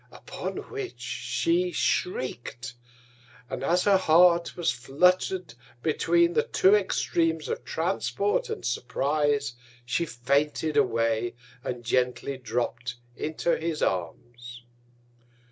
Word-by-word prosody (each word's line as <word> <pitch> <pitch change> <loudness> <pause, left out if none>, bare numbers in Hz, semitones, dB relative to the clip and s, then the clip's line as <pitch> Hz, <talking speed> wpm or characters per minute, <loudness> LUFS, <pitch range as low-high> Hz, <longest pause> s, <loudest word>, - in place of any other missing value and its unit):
Upon - - -6 0.2
which, 420 -3 -6
she 350 +1 0
shriek'd; 365 - -2 0.8
and - - -4
as 175 +5 +2
her 200 -2 +5
Heart 170 0 +4
was 170 -7 +1
flutter'd 180 +8 +1 0.3
between 170 +2 +3
the - - +4
two 190 - +3
Extreams 165 -5 +1
of - - -3
Transport 195 +4 -1
and - - -5
Surprize, 140 +2 0 0.3
she 165 +7 0
fainted 145 +5 0
away, 115 -3 +1 0.3
and 120 -1 -4
gently 125 +2 0
dropp'd 120 0 -3 0.2
into 160 +2 -1
his 160 -1 -2
Arms. 120 +7 -4
150 Hz, 105 wpm, -27 LUFS, 120-175 Hz, 0.8 s, her